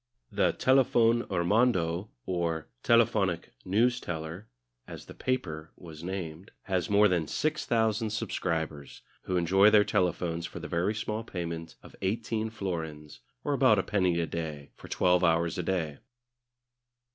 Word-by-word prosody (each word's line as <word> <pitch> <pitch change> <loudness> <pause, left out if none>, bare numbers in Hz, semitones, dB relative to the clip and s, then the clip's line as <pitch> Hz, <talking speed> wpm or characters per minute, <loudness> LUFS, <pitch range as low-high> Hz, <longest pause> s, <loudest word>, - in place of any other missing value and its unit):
The - - +2
Telefon 120 -3 +3
Hirmondo 95 -1 +1 0.2
or 85 -4 -2
"Telephonic 105 - +2
Newsteller," 95 -5 -1 0.4
as - - -9
the - - -11
"paper" 80 -11 -3
was 80 -2 -11
named, 90 0 -5
has 95 -3 -1
more 105 +1 +6
than 85 -5 0
six 155 - -1
thousand 110 -1 +1
subscribers, 80 - -3 0.2
who 90 - 0
enjoy 95 +4 +5
their 105 -1 +6
telephones 90 -4 0
for 90 - -10
the 85 - -6
very 90 +5 0
small 110 0 -3
payment 85 -5 -5
of - - -14
eighteen 110 +3 -1
florins, 80 - -5 0.2
or - - 0
about - - +5
a - - +2
penny 90 -4 +1
a 85 - +1
day, 75 -3 -5
for - - -12
twelve 90 0 +2
hours 85 0 +2
a - - -1
day. 80 -6 -2
90 Hz, 140 wpm, -29 LUFS, 80-110 Hz, 0.4 s, more